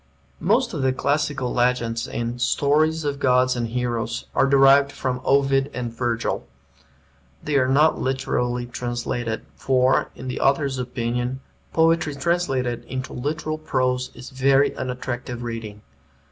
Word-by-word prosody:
Most 230 Hz, +7 st, +2 dB
of 150 Hz, -, -2 dB
the 130 Hz, -1 st, +2 dB
classical 145 Hz, -2 st, -1 dB
legends 120 Hz, -2 st, 0 dB
in 120 Hz, +1 st, -4 dB
"Stories 155 Hz, +5 st, +2 dB
of 140 Hz, -1 st, -2 dB
Gods 130 Hz, -1 st, +3 dB
and 120 Hz, -1 st, -1 dB
Heroes" 120 Hz, -1 st, -2 dB
are -, -, +3 dB
derived 140 Hz, 0 st, +6 dB
from 125 Hz, -2 st, -3 dB
Ovid 135 Hz, 0 st, +3 dB
and 120 Hz, -2 st, -4 dB
Virgil. 115 Hz, -, -2 dB, 1.0 s
They 150 Hz, -, -1 dB
are 130 Hz, -2 st, +3 dB
not 150 Hz, +4 st, +3 dB
literally 125 Hz, -2 st, -1 dB
translated, 120 Hz, -1 st, -3 dB
for, 130 Hz, 0 st, +2 dB
in 130 Hz, -, -8 dB
the 125 Hz, -, -3 dB
author's 135 Hz, -1 st, +2 dB
opinion, 125 Hz, +1 st, -2 dB, 0.3 s
poetry 160 Hz, -2 st, +2 dB
translated 135 Hz, -6 st, -1 dB
into 130 Hz, 0 st, -5 dB
literal 155 Hz, +4 st, -3 dB
prose 130 Hz, -4 st, 0 dB
is 125 Hz, -, -10 dB
very 135 Hz, +1 st, +3 dB
unattractive 125 Hz, -1 st, -4 dB
reading. 115 Hz, -3 st, -6 dB
130 Hz, 130 wpm, -23 LUFS, 120-140 Hz, 1.0 s, derived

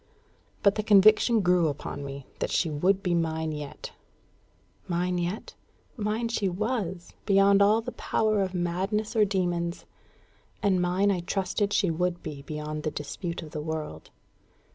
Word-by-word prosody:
But 200 Hz, -, +5 dB
the 215 Hz, -, -1 dB
conviction 215 Hz, +2 st, +5 dB
grew 180 Hz, -2 st, +3 dB
upon 145 Hz, 0 st, -4 dB
me 140 Hz, -1 st, -7 dB
that -, -, -1 dB
she 165 Hz, -, +1 dB
would 185 Hz, +6 st, +1 dB
be 180 Hz, -, +1 dB
mine 160 Hz, -1 st, 0 dB
yet. 150 Hz, -2 st, -7 dB, 1.0 s
Mine 180 Hz, +1 st, 0 dB
yet? 175 Hz, +4 st, -4 dB, 0.4 s
Mine 220 Hz, 0 st, -1 dB
she 215 Hz, -4 st, 0 dB
was, 190 Hz, -3 st, -3 dB
beyond 195 Hz, 0 st, +5 dB
all 210 Hz, +3 st, +5 dB
the -, -, -6 dB
power 215 Hz, -2 st, 0 dB
of 190 Hz, -1 st, -2 dB
madness 190 Hz, +6 st, -1 dB
or 215 Hz, -2 st, +5 dB
demons; 175 Hz, -3 st, -1 dB, 0.8 s
and 190 Hz, -3 st, +3 dB
mine 185 Hz, +3 st, +2 dB
I 185 Hz, -, 0 dB
trusted 195 Hz, +3 st, -1 dB
she 195 Hz, -4 st, +2 dB
would 175 Hz, +1 st, -1 dB
be 145 Hz, -3 st, -6 dB
beyond 150 Hz, +1 st, -5 dB
the 155 Hz, -, -1 dB
dispute 155 Hz, +4 st, -5 dB
of 155 Hz, -, -10 dB
the 155 Hz, -, -4 dB
world. 155 Hz, -, -5 dB
180 Hz, 155 wpm, -27 LUFS, 160-200 Hz, 1.0 s, But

